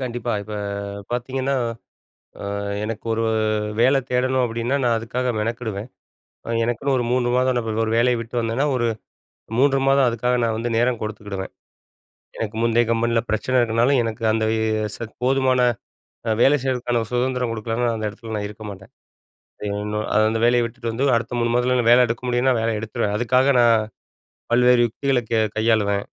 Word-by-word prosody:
கண்டிப்பா. 120 -2 -3
இப்ப 105 +1 -7 0.6
பார்த்தீங்கன்னா, 130 +2 -1 0.9
அ - - -6 0.4
எனக்கு 110 +1 -5
ஒரு 115 0 -1 0.6
வேல 130 +3 +5
தேடணும் 130 +1 +1
அப்டின்னா, 120 +4 -1
நான் 120 -2 +3
அதுக்காக 125 +2 -2
மெனக்கெடுவேன். 110 -1 -3 0.7
எனக்குன்னு 120 +4 -1
ஒரு 120 - 0
3 125 -1 +1
மாதம், 130 0 +2
நா 120 - +1
இப்ப 110 -1 -4
அது 110 - 0
ஒரு 110 - -1
வேலைய 120 0 +3
விட்டு 115 +1 -7
வந்தேன்னா, 115 +5 0
ஒரு 120 -2 +1 0.7
3 135 0 +4
மாதம் 135 -1 +4
அதுக்காக 125 +2 0
நான் 110 -1 0
வந்து 120 +1 -2
நேரம் 120 0 +1
கொடுத்துக்கிடுவேன். 105 -3 -5 0.8
எனக்கு 110 0 -4
முந்தைய 115 0 +3
கம்பெனில 115 0 +2
பிரச்சன 125 +4 +1
இருக்கனால, 115 +2 +2
எனக்கு 115 0 -4
அந்த 110 0 0 0.5
ச - - -18 0.3
போதுமான 130 -1 +2 0.7
அ - - +3
வேலை 145 +2 +5
செய்றதுக்கான 125 -2 0
சுதந்திரம் 125 -1 0
குடுக்கலன்னா, 115 +2 -2
நான் 115 - 0
அந்த 110 -1 -2
இடத்துல 110 +1 -9
நான் 105 -1 -2
இருக்க 105 +1 -11
மாட்டேன். 95 0 -13 0.7
அது 105 - -3 0.2
என்னோ 105 0 -3 0.3
அந்த 115 - -1
வேலைய 120 0 +4
விட்டுட்டு 115 0 -5
வந்து, 130 +5 -1
அடுத்த 115 - -3
3 120 0 +1
மாதத்துல 125 -1 +2
வேல 125 +1 +6
எடுக்க 120 +2 -3
முடியும்னா 125 +1 +2
வேல 115 0 0
எடுத்துருவேன். 110 -2 -2
அதுக்காக 130 +3 +3
நான் 115 -1 +5 0.8
பல்வேறு 125 0 +5
யுக்திகளக் 125 0 -1
க - - +3 0.2
கையாளுவேன். 105 -3 +1
120 Hz, 165 wpm, -22 LUFS, 115-125 Hz, 0.9 s, வேல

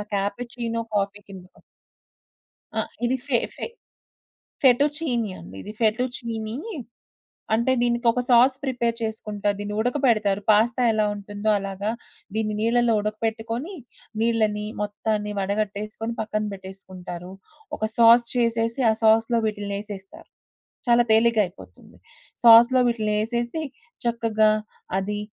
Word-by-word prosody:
Cappuccino 230 +3 -3
coffee 200 0 0
కిందకొ 185 -2 -13 1.2
ఆ! - - +3 0.2
ఇది 250 +2 +1
ఫే 250 - +3 0.2
ఫే - - -4 1.0
ఫెటు 260 +1 +5
చీనీ 245 -10 -1
అండి 90 +3 -11
ఇది. 210 - -8
ఫెటు 225 +3 +2
చీనీ. 225 -2 -5 1.0
అంటే 235 +4 +2
దీనికొక 240 0 +2
సాస్ 250 +2 +6
ప్రిపేర్ 240 -3 -1
చేసుకుంటా. 210 -2 -2
దీన్ని 205 0 -5
ఉడకబెడతారు. 225 -5 +1
పాస్తా 225 +4 +3
ఎలా 215 -1 +2
ఉంటుందో 205 +1 -4
అలాగా, 195 +2 -3 0.4
దీన్ని 215 -1 -1
నీళ్ళలో 235 +1 +2
ఉడకపెట్టుకొని, 225 - -3 0.5
నీళ్ళని 215 -2 +1 0.2
మొత్తాన్ని 210 0 -2
వడగట్టేసుకొని, 210 +3 -3
పక్కన 215 -1 -2
బెట్టేసుకుంటారు. 190 -2 -9 0.5
ఒక 220 - -1
సాస్ 235 +1 +7
చేసేసి, 230 +1 0
ఆ - - +2
సాస్‌లో 225 +2 +4
వీటిలిని 205 -2 -3
ఎసేస్తారు. 195 -2 -9 0.6
చాలా 240 0 +5
తేలిగ్గయిపోతుంది. 220 -4 0 0.5
సాస్‌లో 235 +2 +8
వీటిలినేసేసి, 235 +5 -1 0.4
చక్కగా 225 -2 +2 0.5
అది 205 +2 -3
220 Hz, 105 wpm, -24 LUFS, 205-235 Hz, 1.2 s, సాస్‌లో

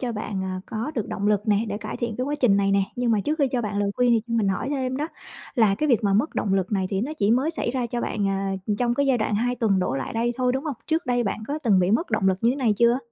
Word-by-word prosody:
cho 245 -2 -2
bạn, 205 -3 -4
à, 185 0 -4
có 230 +5 -3
được 225 -7 -2
động 200 - -2
lực 210 +1 +1
nè, 210 +2 +3
để 205 0 -3
cải - - -6
thiện 235 -3 -3
cái 255 - -1
quá 290 - -2
trình 210 -6 +4
này 195 0 +2
nè. 200 0 +3
Nhưng 245 -1 0
mà 215 -2 +3
trước 305 +8 -2
khi 280 - +3
cho 245 -2 -1
bạn 205 -1 -2
lời 200 -1 +1
khuyên 245 -1 +3
thì 230 -2 +4
cho 230 - -2
mình 220 -4 +2
hỏi 190 +6 -1
thêm 260 -2 -1
đó, 300 +3 -2 0.5
là 220 -6 +4
cái 305 +7 -1
việc 235 -3 +3
mà 200 - +2
mất 250 +10 +1
động 195 - 0
lực 190 +1 -1
này 190 -2 +1
thì 195 -1 0
nó 270 +8 -2
chỉ 200 +1 +2
mới 260 +7 +2
xảy 320 -7 -2
ra 255 -1 -1
cho 240 +1 -3
bạn, 205 -4 -1
à, 195 0 -1 0.3
trong 240 -1 +1
cái 280 +1 +1
giai 265 -3 +3
đoạn 215 -1 0
2 245 +4 +1
tuần 215 -6 +2
đổ 180 -7 0
lại 135 - -4
đây 235 +1 0
thôi, 250 -1 +1
đúng 265 +2 -2
hông? 295 -4 -2
Trước 320 +1 0
đây 245 -1 +1
bạn 205 +2 -3
có 295 +2 -2
từng 220 -10 +3
bị 180 +1 +2
mất 280 - +1
động 190 - +2
lực 190 - +2
như 230 - +4
thế 260 - -1
này 245 -6 +2
chưa? 235 +2 +4
230 Hz, 330 wpm, -24 LUFS, 200-255 Hz, 0.5 s, trình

